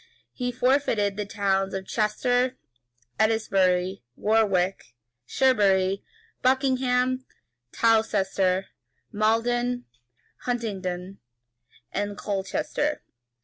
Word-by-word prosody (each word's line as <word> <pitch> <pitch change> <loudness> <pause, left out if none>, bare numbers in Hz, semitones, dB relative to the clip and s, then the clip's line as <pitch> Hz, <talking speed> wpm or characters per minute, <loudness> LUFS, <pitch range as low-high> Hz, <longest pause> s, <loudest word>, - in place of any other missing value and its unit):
He 250 -1 -2
fortified 245 -5 +1
the 210 -1 -4
towns 195 -2 0
of 190 0 -4
Chester, 245 +5 0 0.6
Eddesbury, 195 -4 +2
Warwick, 195 - +1 0.3
Cherbury, 195 - +2 0.4
Buckingham, 255 -1 +2 0.5
Towcester, 195 -4 +2 0.4
Maldon, 240 +3 +1 0.5
Huntingdon, 195 -6 -4 0.7
and 205 0 -3
Colchester. 295 +9 -2
215 Hz, 65 wpm, -26 LUFS, 195-245 Hz, 0.7 s, Eddesbury